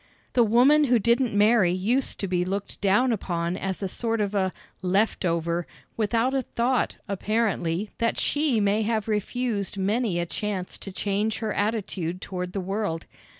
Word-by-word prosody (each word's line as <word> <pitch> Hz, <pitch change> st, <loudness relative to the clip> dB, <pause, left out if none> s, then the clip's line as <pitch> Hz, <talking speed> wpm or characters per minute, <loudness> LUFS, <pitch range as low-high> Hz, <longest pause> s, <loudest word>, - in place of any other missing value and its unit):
The 245 Hz, -, +5 dB
woman 255 Hz, +7 st, +5 dB
who 250 Hz, -2 st, +4 dB
didn't 235 Hz, +1 st, +2 dB
marry 210 Hz, -3 st, +5 dB
used 220 Hz, +9 st, 0 dB
to 195 Hz, -, -1 dB
be 180 Hz, -1 st, +1 dB
looked 195 Hz, +2 st, -4 dB
down 205 Hz, +6 st, +3 dB
upon 175 Hz, -5 st, -1 dB
as 190 Hz, +1 st, -3 dB
a -, -, 0 dB
sort 225 Hz, +4 st, -1 dB
of 205 Hz, -1 st, 0 dB
a 190 Hz, -2 st, +1 dB, 0.3 s
"leftover" 175 Hz, -3 st, 0 dB, 0.3 s
without 230 Hz, +4 st, +1 dB
a 270 Hz, -, +2 dB
thought, 245 Hz, 0 st, 0 dB
apparently, 200 Hz, -2 st, -1 dB
that 230 Hz, -1 st, +1 dB
she 290 Hz, -6 st, +1 dB
may 205 Hz, +1 st, +2 dB
have 220 Hz, 0 st, 0 dB
refused 210 Hz, -1 st, -1 dB
many 205 Hz, 0 st, 0 dB
a 175 Hz, -, 0 dB
chance 190 Hz, 0 st, -4 dB
to 195 Hz, -, -7 dB
change 205 Hz, +3 st, -1 dB
her 220 Hz, -2 st, -2 dB
attitude 195 Hz, -5 st, -2 dB
toward 180 Hz, -2 st, -5 dB
the 200 Hz, -, -2 dB
world. 195 Hz, -3 st, -2 dB
205 Hz, 160 wpm, -26 LUFS, 185-230 Hz, 0.3 s, The